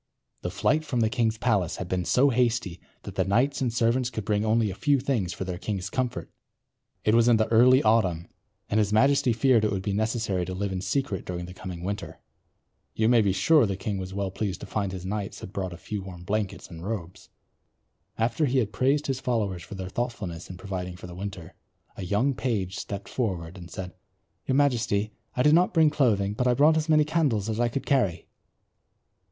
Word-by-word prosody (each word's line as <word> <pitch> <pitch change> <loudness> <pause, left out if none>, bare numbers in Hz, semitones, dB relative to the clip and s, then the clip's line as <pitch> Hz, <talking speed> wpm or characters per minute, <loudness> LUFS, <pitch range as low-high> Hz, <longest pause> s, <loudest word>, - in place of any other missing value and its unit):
The 90 - -3
flight 105 +11 +1
from 125 -6 -1
the 110 -1 +2
king's 115 -4 +1
palace 105 -8 +1
had 95 - -5
been 90 -1 -1
so 125 - +4
hasty 115 -7 0 0.2
that - - -7
the 95 - +1
knights 125 +10 +1
and 125 -3 +1
servants 120 +2 +1
could 110 -5 -5
bring 105 0 +1
only 110 -1 +2
a - - -5
few 140 +7 +2
things 125 -9 -1
for - - -5
their 90 -1 -5
king's 100 -2 -3
comfort. 130 -1 -2 0.7
It 110 - +4
was 115 0 +5
in 120 -2 +6
the 110 0 +1
early 125 +4 +6
autumn 95 -7 +2 0.4
and 105 - +1
his 105 -1 +1
majesty 130 +3 +4
feared 115 0 +3
it 105 - +2
would 95 -2 -2
be 100 0 -1
necessary 110 -3 0
to 95 - -5
live 100 +1 -2
in 95 -1 -3
secret 120 -3 -1
during 90 -1 -5
the 90 - -9
coming 90 -2 -7
winter. 100 +2 -5 0.8
You 110 0 +2
may 120 -2 +5
be 100 -2 +2
sure 150 - +4
the 100 - -2
king 95 +1 -3
was 95 0 -6
well 100 0 -2
pleased 95 -2 -3
to - - -6
find 100 -3 -2
his 95 -1 -6
knights 100 0 -4
had 95 - -9
brought 95 -2 -3
a 85 - -8
few 105 +3 -5
warm 90 -2 -9
blankets 100 +1 -2
and 85 -1 -10
robes. 95 -4 -6 0.9
After 120 +7 +1
he 135 +1 +1
had 110 -5 0
praised 140 +8 +2
his 135 -2 -1
followers 105 -9 -1
for 100 - -9
their 95 -1 -5
thoughtfulness 95 -6 -4
in 90 - -8
providing 90 -2 -5
for 90 - -11
the 90 - -9
winter, 95 -2 -7 0.4
a 95 - -6
young 105 +9 +1
page 105 -8 -2
stepped 100 -1 -6
forward 90 -8 -3
and 90 -2 -10
said, 90 -1 -6 0.5
"Your 130 - +1
Majesty, 115 -7 +1 0.2
I 125 - +3
did 150 - +5
not 180 +2 +3
bring 160 -2 +5
clothing, 105 -9 +2
but 125 +4 0
I 125 - +3
brought 150 +4 +5
as 160 0 -1
many 155 -1 +5
candles 145 -10 +1
as 110 0 -2
I 120 0 +2
could 135 +4 -4
carry." 125 -11 +1
105 Hz, 215 wpm, -26 LUFS, 95-125 Hz, 0.9 s, in